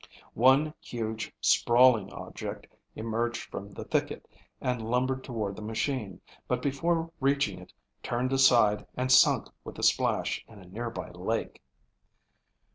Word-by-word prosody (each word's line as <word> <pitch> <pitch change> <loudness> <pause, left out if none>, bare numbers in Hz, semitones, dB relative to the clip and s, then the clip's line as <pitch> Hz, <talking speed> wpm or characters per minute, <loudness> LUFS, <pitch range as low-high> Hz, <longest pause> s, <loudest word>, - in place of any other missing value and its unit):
One 135 +6 +4
huge, 110 -2 -5
sprawling 120 -4 +4
object - - -7 0.3
emerged 115 +2 -2
from 100 +1 -6
the 100 - -8
thicket - - -2 0.3
and 125 -2 -1
lumbered 130 +2 0
toward 110 -6 -4
the - - -9
machine, 110 -2 -3 0.3
but 125 - 0
before 165 +4 0
reaching 135 -8 +1
it 90 - -14 0.3
turned 125 +2 -1
aside 115 -6 +4
and 130 +1 0
sunk 130 - +5
with - - -9
a - - -6
splash - - +1
in 110 - -15
a 95 - -13
nearby 115 +6 -6
lake. - - -3
120 Hz, 130 wpm, -29 LUFS, 110-130 Hz, 0.3 s, sunk